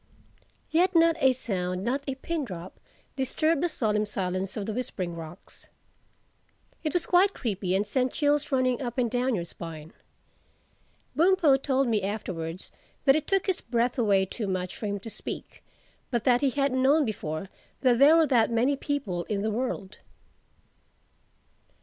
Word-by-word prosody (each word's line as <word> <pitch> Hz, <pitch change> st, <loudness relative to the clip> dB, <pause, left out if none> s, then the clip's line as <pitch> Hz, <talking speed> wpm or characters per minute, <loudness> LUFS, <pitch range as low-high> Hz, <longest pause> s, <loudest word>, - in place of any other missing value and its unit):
Yet 360 Hz, +3 st, +3 dB
not 330 Hz, 0 st, +5 dB
a 265 Hz, -, +5 dB
sound, 185 Hz, -7 st, -2 dB
not 255 Hz, +5 st, 0 dB
a 270 Hz, -, -2 dB
pin 320 Hz, +3 st, -3 dB
drop, 180 Hz, -6 st, -8 dB, 0.4 s
disturbed 300 Hz, +3 st, +1 dB
the 350 Hz, -, +1 dB
solemn 215 Hz, -7 st, 0 dB
silence 185 Hz, -1 st, -3 dB
of 205 Hz, -, -3 dB
the 220 Hz, -, -3 dB
Whispering 195 Hz, -7 st, -4 dB
Rocks. 165 Hz, +2 st, -11 dB, 1.2 s
It 310 Hz, -, -1 dB
was 350 Hz, -1 st, +1 dB
quite 380 Hz, +3 st, +4 dB
creepy 195 Hz, -6 st, -2 dB
and 200 Hz, +2 st, +1 dB
sent 255 Hz, +4 st, 0 dB
chills 295 Hz, 0 st, +1 dB
running 255 Hz, -2 st, +1 dB
up 240 Hz, -2 st, -4 dB
and 240 Hz, -3 st, +1 dB
down 250 Hz, 0 st, +1 dB
your 170 Hz, -3 st, -3 dB
spine. 165 Hz, -2 st, -9 dB, 1.2 s
Bumpo 335 Hz, -4 st, +5 dB
told 270 Hz, -1 st, +1 dB
me 220 Hz, -3 st, +1 dB
afterwards 185 Hz, -4 st, -5 dB, 0.3 s
that 270 Hz, -1 st, +6 dB
it 310 Hz, -1 st, -1 dB
took 390 Hz, -1 st, +1 dB
his 380 Hz, -3 st, -1 dB
breath 240 Hz, +1 st, 0 dB
away 200 Hz, -4 st, +3 dB
too 210 Hz, +2 st, -5 dB
much 185 Hz, -1 st, -3 dB
for 215 Hz, -, -4 dB
him 205 Hz, 0 st, -2 dB
to 225 Hz, -, -7 dB
speak, 210 Hz, -, -8 dB, 0.5 s
but 240 Hz, -4 st, -1 dB
that 245 Hz, -2 st, +3 dB
he 280 Hz, -, +3 dB
hadn't 275 Hz, -1 st, 0 dB
known 285 Hz, +3 st, +4 dB
before 185 Hz, -5 st, -4 dB, 0.3 s
that 245 Hz, -3 st, +3 dB
there 290 Hz, +4 st, +7 dB
were 330 Hz, -1 st, +5 dB
that 240 Hz, -6 st, +3 dB
many 240 Hz, +5 st, +2 dB
people 260 Hz, -, -3 dB
in 205 Hz, -2 st, -2 dB
the 220 Hz, -, 0 dB
world. 215 Hz, -4 st, -3 dB
240 Hz, 165 wpm, -27 LUFS, 195-280 Hz, 1.2 s, there